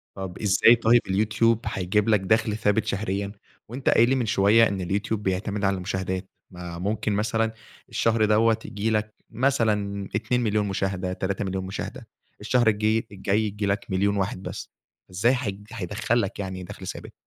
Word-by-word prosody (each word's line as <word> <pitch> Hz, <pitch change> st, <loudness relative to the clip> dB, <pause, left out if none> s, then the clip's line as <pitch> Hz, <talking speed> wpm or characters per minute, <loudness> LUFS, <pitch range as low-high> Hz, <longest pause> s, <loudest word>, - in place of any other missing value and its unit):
طب 95 Hz, -2 st, -6 dB
إزاي 105 Hz, +3 st, +6 dB
طيب 115 Hz, +1 st, +4 dB
اليوتيوب 110 Hz, +3 st, +2 dB
هيجيب 105 Hz, +1 st, 0 dB
لك 105 Hz, -2 st, +4 dB
دخل 110 Hz, +2 st, +1 dB
ثابت 105 Hz, -1 st, +1 dB
شهريًا، 100 Hz, 0 st, -2 dB, 0.4 s
وأنت 125 Hz, +4 st, -2 dB
قايل 120 Hz, +1 st, +5 dB
لي 135 Hz, -, +3 dB
من 125 Hz, -3 st, 0 dB
شوية 105 Hz, +2 st, +4 dB
إن 95 Hz, -2 st, -3 dB
اليوتيوب 100 Hz, +3 st, -2 dB
بيعتمد 100 Hz, +2 st, -2 dB
على 95 Hz, 0 st, +2 dB
المشاهدات؟ 95 Hz, 0 st, -3 dB, 0.2 s
ما 90 Hz, -1 st, -7 dB
ممكن 105 Hz, +3 st, -1 dB
مثلًا 110 Hz, +2 st, 0 dB, 0.4 s
الشهر 115 Hz, -1 st, +2 dB
دوّة 110 Hz, +1 st, +3 dB
ييجي 105 Hz, +2 st, -2 dB
لك 105 Hz, -1 st, -1 dB, 0.2 s
مثلًا 105 Hz, -6 st, 0 dB
2.000.000 110 Hz, -1 st, 0 dB
مشاهدة، 95 Hz, -1 st, -2 dB
3.000.000 95 Hz, 0 st, -3 dB
مشاهدة، 95 Hz, +1 st, -6 dB, 0.3 s
الشهر 125 Hz, -2 st, +2 dB
الجي 110 Hz, +1 st, +2 dB
الجاي 100 Hz, +1 st, 0 dB
ييجي 105 Hz, -1 st, -2 dB
لك 100 Hz, 0 st, -1 dB
1.000.000 100 Hz, +2 st, +1 dB
واحد 95 Hz, -1 st, -2 dB
بس، -, -, -6 dB, 0.4 s
إزاي 100 Hz, +7 st, +2 dB
هي 100 Hz, -4 st, -3 dB, 0.2 s
هيدخَّل 115 Hz, +3 st, -1 dB
لك 100 Hz, -, -4 dB
يعني 95 Hz, -2 st, -4 dB
دخل 90 Hz, -, -9 dB
ثابت؟ -, -, -7 dB
105 Hz, 160 wpm, -25 LUFS, 95-110 Hz, 0.4 s, إزاي